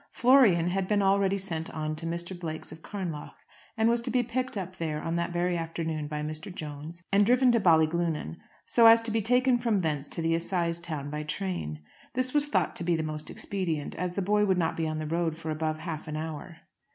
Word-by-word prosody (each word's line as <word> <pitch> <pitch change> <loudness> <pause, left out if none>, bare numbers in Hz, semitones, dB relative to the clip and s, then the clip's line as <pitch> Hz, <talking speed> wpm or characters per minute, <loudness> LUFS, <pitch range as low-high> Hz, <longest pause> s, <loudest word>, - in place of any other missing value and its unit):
Florian 235 -10 +5
had 190 +1 -1
been 205 -1 +2
already 195 0 +3
sent 170 -4 -4
on 155 0 -3
to 165 +1 -4
Mr. 170 +2 -4
Blake's 160 -2 -5
of 160 - -11
Carnlough, 175 -8 -5 0.4
and 220 0 +3
was 235 0 +2
to 240 - -4
be 250 0 +2
picked 250 0 -3
up 185 -1 -5
there 155 -2 -2
on 165 +2 -2
that 170 0 0
very 175 +1 0
afternoon 165 -2 -3
by 150 0 -3
Mr. 155 +4 -5
Jones, 155 +1 -8
and 200 +1 +5
driven 250 +3 +5
to 235 - +3
Ballyglunin, 160 - +2 0.3
so 230 -1 +6
as 230 0 +8
to 225 - -2
be 225 +1 +1
taken 250 +3 +3
from 225 -5 +1
thence 150 -4 -1
to 165 - -5
the 165 0 +2
assize 170 0 -1
town 155 -4 -5
by 150 0 -3
train. 155 - -4 0.3
This 255 0 0
was 295 0 +2
thought 185 - +1
to - - -5
be 170 -1 +1
most 155 -1 -4
expedient, 170 -7 -3
as 180 +1 -3
the 195 - -1
boy 210 +2 +3
would 190 -3 +2
not 165 -2 +1
be 165 -1 -1
on 155 0 -2
the 155 - -3
road 165 0 -1
for 160 -1 -4
above 155 0 -1
half 160 -1 -6
an 155 0 -3
hour. 160 +2 -6
170 Hz, 225 wpm, -28 LUFS, 155-200 Hz, 0.4 s, as